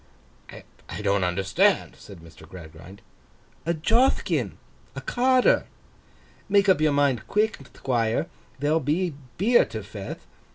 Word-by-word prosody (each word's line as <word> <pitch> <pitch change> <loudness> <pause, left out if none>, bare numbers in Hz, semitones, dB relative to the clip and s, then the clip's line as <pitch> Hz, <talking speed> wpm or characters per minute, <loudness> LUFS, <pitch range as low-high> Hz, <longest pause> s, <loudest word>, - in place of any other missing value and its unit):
'I 105 - -11
don't 100 -1 +1
understand,' 95 - +1
said 95 -5 -13
Mr. 80 -1 -15
Gradgrind. 90 +3 -12 0.6
'A 170 - +1
Jothkin—a 235 - -1
Carter. 255 +1 +2 0.8
Make 200 0 +4
up 185 -5 +4
your 155 -1 +3
mind 140 -5 +1
quick, 215 +1 +1
Thquire. 115 -3 -1 0.3
There'll 150 +4 +1
be 160 +4 -1 0.2
beer 230 +8 +4
to 110 -2 -7
feth. 100 -1 -8
140 Hz, 115 wpm, -25 LUFS, -, 0.8 s, Make